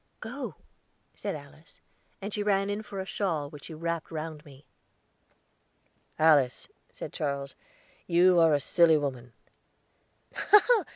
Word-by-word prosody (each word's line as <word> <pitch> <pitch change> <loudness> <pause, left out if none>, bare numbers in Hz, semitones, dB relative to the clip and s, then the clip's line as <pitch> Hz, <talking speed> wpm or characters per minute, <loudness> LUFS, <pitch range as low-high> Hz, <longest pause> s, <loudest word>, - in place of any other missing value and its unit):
"Go," - - -6 0.6
said - - -4
Alice; 155 +4 -14 0.4
and 200 +1 -4
she 210 - -1
ran 200 -1 +1
in 205 +1 -3
for 200 -2 -8
a 190 - -3
shawl, 165 -8 -2
which 150 -3 -11
she 160 - -8
wrapped 170 0 -3
round 155 -1 -6
me. 140 -2 -16 1.5
"Alice," 150 -5 +3 0.2
said - - -8
Charles, 140 -3 -3 0.5
"you 180 +1 +5
are 165 -2 +5
a - - +1
silly 160 +3 +4
woman." 130 -4 -4
160 Hz, 125 wpm, -28 LUFS, 145-180 Hz, 1.5 s, you